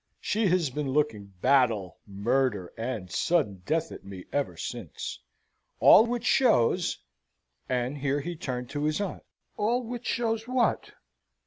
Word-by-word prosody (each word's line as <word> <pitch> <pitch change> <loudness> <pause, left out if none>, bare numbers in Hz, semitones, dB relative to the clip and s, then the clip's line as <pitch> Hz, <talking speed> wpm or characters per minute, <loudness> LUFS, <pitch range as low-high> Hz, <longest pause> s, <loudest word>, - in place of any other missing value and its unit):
She 215 0 0
has 175 -6 +2
been 145 +1 -3
looking 130 -7 0 0.2
battle, 115 -10 +2
murder, 105 -1 0
and 115 -6 -4
sudden 130 - +1
death 160 +1 0
at - - -9
me 95 -2 -9
ever 145 -1 -1
since. 115 -10 -6 0.6
All 225 - +8
which 240 -1 -2
shows 180 - +3 0.4
" - - -51 0.3
and 125 +3 -1
here 140 +1 0
he 175 +3 -5
turned 125 -6 -5
to 145 0 -2
his 155 +3 0
aunt. 200 -3 -3 0.4
"All 240 +4 +1
which 240 +1 -6
shows 225 -1 -1
what?" 255 -1 +1
145 Hz, 145 wpm, -28 LUFS, -, 0.6 s, All